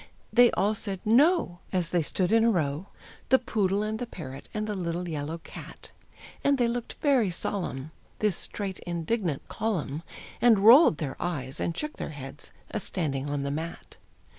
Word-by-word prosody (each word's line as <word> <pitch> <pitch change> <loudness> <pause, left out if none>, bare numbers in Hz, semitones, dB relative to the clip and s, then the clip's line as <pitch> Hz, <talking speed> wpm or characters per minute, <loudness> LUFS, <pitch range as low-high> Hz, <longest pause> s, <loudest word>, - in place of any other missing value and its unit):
They 245 0 +7
all 205 +2 +2
said 200 -3 -3
"No!" 245 - +4
As 180 -3 0
they 175 -1 +2
stood 180 +4 0
in 225 0 +5
a 230 - +5
row, 160 -3 0 0.4
The 260 - +7
poodle, 205 -5 0
and 215 +1 -2
the 245 - -3
parrot, 140 - -9
and 215 -1 -2
the 210 -1 -3
little 175 -1 -3
yellow 155 0 -3
cat, 165 - -11 0.5
And 280 0 +3
they 240 -2 +3
looked 235 0 -3
very 265 -9 +4
solemn, 165 -5 -3 0.3
This 210 -4 +1
straight, 195 0 -3
indignant 170 -1 -2
column, 170 -9 -2 0.4
And 235 -3 +6
rolled 225 - +8
their 145 -4 -4
eyes, 145 -6 -3
and 170 - -2
shook 300 0 -3
their - - -4
heads, 140 -1 -9 0.2
a 215 - -1
standing 145 -8 -2
on 145 -1 -1
the 140 - -2
mat. 160 +3 -6
185 Hz, 175 wpm, -28 LUFS, 155-225 Hz, 0.5 s, rolled